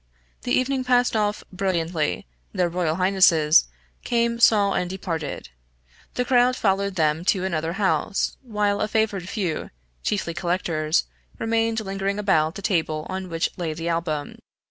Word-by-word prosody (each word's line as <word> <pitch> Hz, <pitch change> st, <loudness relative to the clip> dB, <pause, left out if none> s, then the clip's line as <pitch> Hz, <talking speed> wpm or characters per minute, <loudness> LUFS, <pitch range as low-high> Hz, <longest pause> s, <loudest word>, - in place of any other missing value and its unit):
The 245 Hz, -, -4 dB
evening 255 Hz, +1 st, +1 dB
passed 250 Hz, -1 st, +2 dB
off 210 Hz, -1 st, 0 dB
brilliantly, 170 Hz, -, -1 dB, 0.3 s
their 180 Hz, -1 st, +1 dB
royal 170 Hz, -2 st, -1 dB
highnesses, 180 Hz, -, +4 dB, 0.4 s
came, 235 Hz, 0 st, 0 dB
saw, 205 Hz, -4 st, +5 dB
and 180 Hz, -, -1 dB
departed. 165 Hz, -, -4 dB, 0.7 s
The 250 Hz, -, 0 dB
crowd 250 Hz, 0 st, +4 dB
followed 200 Hz, -3 st, 0 dB
them 160 Hz, -1 st, +1 dB
to 190 Hz, -1 st, +2 dB
another 165 Hz, -2 st, -2 dB
house, 195 Hz, 0 st, 0 dB
while 210 Hz, -5 st, -1 dB
a 215 Hz, -, +1 dB
favored 210 Hz, -4 st, -1 dB
few, 190 Hz, -7 st, -2 dB, 0.3 s
chiefly 180 Hz, -, -1 dB
collectors, 170 Hz, -3 st, 0 dB, 0.3 s
remained 225 Hz, 0 st, 0 dB
lingering 195 Hz, 0 st, -2 dB
about 165 Hz, -6 st, +2 dB
the 200 Hz, -, -8 dB
table 160 Hz, -6 st, 0 dB
on 190 Hz, -1 st, -4 dB
which 165 Hz, -1 st, -1 dB
lay 165 Hz, -4 st, -3 dB
the 165 Hz, +1 st, -3 dB
Album. 165 Hz, -3 st, -2 dB
190 Hz, 145 wpm, -24 LUFS, 165-215 Hz, 0.7 s, saw